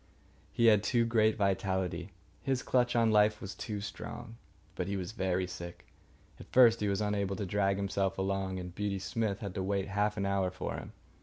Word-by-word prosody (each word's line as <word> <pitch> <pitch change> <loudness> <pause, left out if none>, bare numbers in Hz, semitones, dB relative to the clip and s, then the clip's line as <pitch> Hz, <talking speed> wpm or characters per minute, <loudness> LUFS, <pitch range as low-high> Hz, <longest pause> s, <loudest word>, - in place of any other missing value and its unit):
He 115 - +2
had 105 -3 +6
too 115 +2 +2
great 110 -2 +3
vitality. 95 -2 0 0.3
His 130 -2 -1
clutch 120 -1 +2
on 115 -1 +4
life 105 0 +4
was 95 - -6
too 105 -2 -5
strong. 110 +3 -7 0.4
But 90 - -3
he 100 0 -1
was 90 +1 -4
very 95 -4 0
sick. 85 -1 -8 0.5
At - - -13
first 115 -3 +7
he 105 - 0
was 100 +1 0
unable 100 -2 0
to 100 - -3
drag 100 +1 +1
himself 95 -1 -1
along, 95 0 -1
and 90 -1 -6
Beauty 100 +1 -2
Smith 100 +1 -2
had 100 -3 -4
to 95 - -3
wait 100 +1 -1
half 105 +2 0
an 100 - 0
hour 100 -1 +1
for 95 - -5
him. - - -7
100 Hz, 200 wpm, -32 LUFS, 95-110 Hz, 0.5 s, first